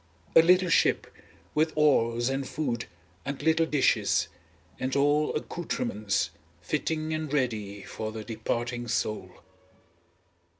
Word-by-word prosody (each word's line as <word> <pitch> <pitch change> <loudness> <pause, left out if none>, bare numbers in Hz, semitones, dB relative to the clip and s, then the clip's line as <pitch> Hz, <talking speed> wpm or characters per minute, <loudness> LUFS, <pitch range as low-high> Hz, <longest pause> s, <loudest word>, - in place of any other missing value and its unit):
A - - +10
little 180 +2 +4
ship, - - +3 0.5
with 155 +1 +2
oars 120 -6 +3
and 135 0 -1
food 130 -4 -2 0.4
and 140 0 -4
little 160 +1 +3
dishes, 145 -4 +2 0.5
and 130 +1 -2
all 145 +2 +3
accoutrements 170 - -2 0.3
fitting 155 -1 -2
and 155 -2 -3
ready 110 -8 -1
for 110 0 -5
the 110 0 -6
departing 120 +2 -3
soul. 105 -4 -2
135 Hz, 115 wpm, -28 LUFS, 115-155 Hz, 0.5 s, A